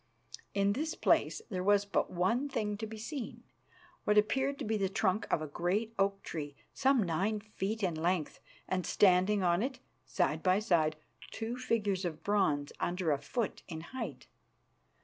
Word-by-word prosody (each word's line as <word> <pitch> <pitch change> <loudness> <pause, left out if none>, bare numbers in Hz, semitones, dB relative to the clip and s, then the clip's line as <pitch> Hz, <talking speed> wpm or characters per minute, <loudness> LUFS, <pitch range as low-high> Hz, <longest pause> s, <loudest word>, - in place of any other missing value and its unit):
In 200 0 +3
this 315 +7 -2
place 445 - +2
there 185 -2 -1
was 205 +1 +4
but 200 - 0
one 230 +11 +1
thing 210 -5 -1
to 220 +1 -4
be 220 +1 -8
seen: 245 +3 -6 0.6
what 210 0 +3
appeared 265 +6 +2
to - - -4
be 220 +1 0
the 195 -2 +1
trunk 195 +1 0
of 155 - +2
a - - -4
great 190 +9 -1
oak 195 0 +1
tree, 145 -3 -5 0.2
some 265 -3 +3
nine 195 +5 0
feet 215 0 -4
in 180 -3 +1
length, 165 0 -1 0.3
and, 185 -1 0
standing 190 +2 +4
on 175 +1 +3
it, 260 +2 -2 0.3
side 150 +4 +1
by 185 +2 +4
side, 170 -7 +2 0.3
two 225 +2 -4
figures 210 -6 0
of 165 -3 -4
bronze 155 -9 +1
under 175 -2 0
a 140 - +1
foot 235 - -3
in 160 -3 -6
height. 260 - -5
200 Hz, 170 wpm, -32 LUFS, 175-220 Hz, 0.6 s, was